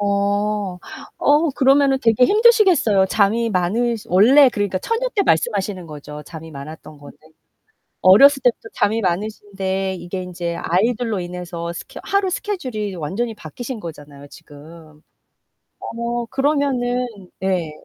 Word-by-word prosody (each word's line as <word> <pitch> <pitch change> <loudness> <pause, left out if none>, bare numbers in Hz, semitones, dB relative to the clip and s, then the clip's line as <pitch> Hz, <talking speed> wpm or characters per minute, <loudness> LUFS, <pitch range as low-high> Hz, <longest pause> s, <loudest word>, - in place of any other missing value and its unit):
어 200 -1 -1 0.4
어 300 +2 +3
그러면은 270 0 +3
되게 230 +1 +4
힘드시겠어요. 385 - +4
잠이 220 +3 +1
많으시 220 +5 -1
원래 255 +10 +6
그러니까 205 -5 -2
처녀 460 - -2
때 405 - +2
말씀하시는 195 - 0
거죠? 150 -1 -9
잠이 160 0 -10
많았던 150 +1 -10
거는. 145 - -14 0.9
어렸을 270 +9 +7
때부터 230 -2 0
잠이 220 +2 0
많으신데 195 0 -3
이게 185 +2 -6
인제 175 -2 -5
아이들로 220 +3 0
인해서 175 -1 -6
스케 - - -9
하루 395 -1 0
스케줄이 255 - -4
완전히 195 +9 -3
바뀌신 230 - -8
거잖아요, 145 -5 -10
지금. 155 +2 -15 0.8
어 235 +1 -4
그러면은 265 -3 0 0.3
네. 185 -4 -1
205 Hz, 305 characters per minute, -20 LUFS, 175-250 Hz, 0.9 s, 어렸을